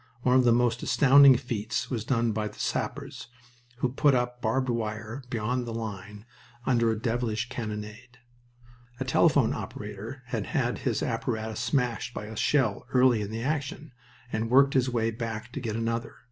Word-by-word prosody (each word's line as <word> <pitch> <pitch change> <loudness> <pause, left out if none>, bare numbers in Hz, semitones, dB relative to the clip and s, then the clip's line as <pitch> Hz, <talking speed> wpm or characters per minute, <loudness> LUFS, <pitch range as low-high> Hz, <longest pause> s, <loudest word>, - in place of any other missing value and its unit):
One 125 0 +4
of 130 -1 +5
the 120 - +5
most 120 0 +2
astounding 140 -1 +7
feats 115 -4 -3
was 115 -4 -2
done 115 -2 +1
by 105 0 -2
the - - -11
sappers, - - -3 0.5
who 130 - 0
put 140 +2 +3
up 125 0 -1
barbed 130 +4 0
wire 110 +1 -3
beyond 120 +2 -2
the 115 - -4
line 105 -1 -6 0.4
under 120 -3 +3
a 110 - 0
devilish 115 0 -1
cannonade. 110 +1 -6 0.8
A - - -2
telephone - - +3
operator 105 +6 -7
had 125 - -3
had - - -1
his - - -1
apparatus 110 -1 -2
smashed 125 -1 -1
by 105 - -5
a 110 +1 -8
shell 120 -3 +1
early 125 -3 +4
in 100 - -4
the 115 +1 -4
action, 145 0 -3 0.4
and 110 +1 -1
worked 140 +2 +5
his 130 -1 +2
way 115 -2 0
back 115 0 -5
to 135 - -5
get 115 -4 -3
another. 115 +1 -2
115 Hz, 170 wpm, -27 LUFS, 110-125 Hz, 0.8 s, astounding